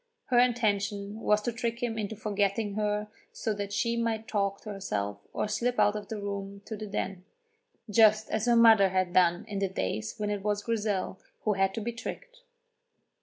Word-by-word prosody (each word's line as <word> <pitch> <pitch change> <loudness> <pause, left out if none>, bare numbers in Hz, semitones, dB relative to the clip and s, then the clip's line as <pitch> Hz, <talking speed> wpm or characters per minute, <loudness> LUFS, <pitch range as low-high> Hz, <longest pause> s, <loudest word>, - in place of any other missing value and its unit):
Her 245 - +6
intention 205 -4 +1
was 210 -1 +2
to 240 - 0
trick 235 +1 -3
him 235 -2 -1
into 220 0 -3
forgetting 205 0 0
her 210 0 -1 0.2
so 220 - -2
that 200 -1 -4
she 235 +3 0
might 225 -1 -1
talk 200 -3 0
to 215 - -6
herself 105 - -3
or - - -1
slip 235 +4 -1
out 210 - +4
of 210 -1 -5
the 220 - -5
room 200 0 -5
to 220 - -5
the 215 0 -6
Den, 195 -2 -3 0.6
just 215 0 +5
as 220 +2 0
her 240 - +5
mother 225 -4 +7
had 185 -1 0
done 175 -1 +3
in 205 -2 -3
the 195 -1 0
days 110 - -3
when 210 -1 -1
it 205 -1 -2
was 205 0 -1
Grizel 210 -4 -1 0.2
who 215 - +2
had 195 0 +1
to 225 - -3
be 235 +3 -2
tricked. - - -7
210 Hz, 195 wpm, -29 LUFS, 200-225 Hz, 0.6 s, mother